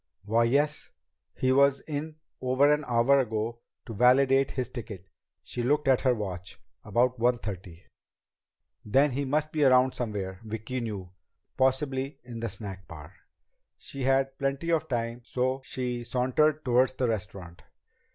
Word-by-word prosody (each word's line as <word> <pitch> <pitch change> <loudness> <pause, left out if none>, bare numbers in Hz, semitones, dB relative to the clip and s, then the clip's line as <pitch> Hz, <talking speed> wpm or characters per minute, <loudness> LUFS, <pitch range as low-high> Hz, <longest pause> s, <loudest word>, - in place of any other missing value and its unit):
"Why, 115 +3 +3
yes. 145 +5 +1 0.5
He 130 - +1
was 140 0 +4
in 155 +1 -5 0.3
over 130 +3 +4
an 150 +1 -1
hour 120 +4 +4
ago 115 -1 -2 0.3
to 115 - -7
validate 135 +4 +4
his 130 -3 -3
ticket." 110 -7 -8 0.4
She 120 - -4
looked 140 +4 +1
at 130 -2 +4
her 130 -2 +3
watch. 95 -4 -6 0.2
"About 125 +1 +1
one 120 +1 +3
thirty." 95 -5 -8 1.0
Then 135 +7 +3
he 140 +3 -2
must 150 +3 0
be 155 - -2 0.3
somewhere 105 -6 -3
around, 95 +4 -14
Vicki 110 +4 -4
knew. 100 -6 -5 0.4
Possibly 130 +1 0
in 120 -2 -8
the 115 0 -3
snack 95 -1 -8
bar. 75 0 -11 0.6
She 140 - -9
had 135 +1 +1
plenty 140 +4 -1
of 160 -1 +1
time, 120 -1 -2
so 130 +2 -1
she 125 -2 -3
sauntered 130 +6 +1
toward 125 +1 +4
the 125 - +1
restaurant. 95 -5 -5
125 Hz, 150 wpm, -28 LUFS, 110-135 Hz, 1.0 s, was